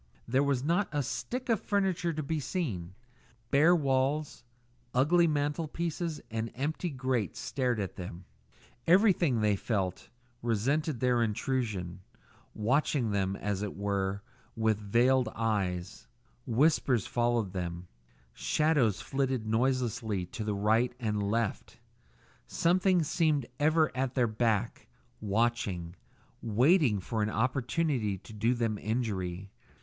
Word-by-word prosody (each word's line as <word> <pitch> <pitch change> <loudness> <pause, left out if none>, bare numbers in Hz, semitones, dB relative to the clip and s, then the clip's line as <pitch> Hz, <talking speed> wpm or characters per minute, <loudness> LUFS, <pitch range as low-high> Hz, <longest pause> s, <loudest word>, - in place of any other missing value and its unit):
There 130 +3 +2
was 140 -3 +1
not 175 +6 +1
a 145 -2 0
stick 250 - -4
of 225 -4 +1
furniture 190 -5 0
to 155 -1 -3
be 160 +2 -2
seen. 105 - -3 0.6
Bare 160 +6 +6
walls, 140 -1 0 0.5
ugly 170 +7 +4
mantel 150 +1 0
pieces 165 0 -3
and 115 0 -3
empty 155 +7 -2
grates 130 -6 -2
stared 125 -4 -1
at 95 -3 -4
them. 90 -1 -7 0.6
Everything, 175 - +4
they 105 -1 +3
felt, 95 -3 -2 0.3
resented 130 +5 0
their 125 -2 +3
intrusion, 105 -6 -2 0.5
watching 125 +1 +1
them, 95 -1 0
as 100 -1 -2
it 105 -2 -4
were, 100 0 -1 0.3
with 110 -2 +1
veiled 120 +4 +3
eyes; 95 -5 -2 0.4
whispers 130 -2 +2
followed 120 -5 0
them; 90 -1 -4 0.5
shadows 150 - +1
flitted 135 -4 -1
noiselessly 110 -4 0
to 110 +2 -4
right 110 +5 +2
and 105 -4 -1
left; 110 +2 -2 0.7
something 180 +1 +2
seemed 150 -3 +1
ever 155 -1 +3
at 130 0 -1
their 125 -3 +3
back, 110 0 -1 0.3
watching, 100 -5 -1 0.5
waiting 120 - +3
an 110 -2 +1
opportunity 125 -1 0
to 110 +4 -13
do 115 +4 +1
them 115 -3 -1
injury. 100 -5 -3
120 Hz, 120 wpm, -30 LUFS, 105-145 Hz, 0.7 s, Bare